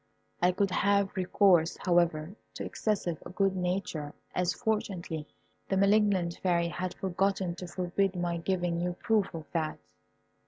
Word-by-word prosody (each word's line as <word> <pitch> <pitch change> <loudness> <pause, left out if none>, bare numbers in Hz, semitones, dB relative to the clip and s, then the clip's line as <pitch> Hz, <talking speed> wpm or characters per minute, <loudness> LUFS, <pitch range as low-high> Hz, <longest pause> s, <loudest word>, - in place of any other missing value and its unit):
I 180 +1 +5
could 195 +1 0
have 200 +1 +2
recourse, 185 -3 +3
however, 170 -2 +2 0.2
to - - -4
excessive 190 -7 -1
good 195 -1 +2
nature, 180 -5 -2 0.2
as, 180 -1 +1
fortunately, 185 -8 -2 0.4
the 195 - +1
malignant 200 -3 +3
Fairy 170 -2 +2
had 180 +1 -4
forgotten 190 -1 0
to 180 - -6
forbid 185 +2 0
my 175 -1 -1
giving 175 -1 -1
you 180 0 -1
proof 210 +2 +1
of 160 -1 -6
that. 160 -2 -1
180 Hz, 135 wpm, -30 LUFS, 170-195 Hz, 0.4 s, I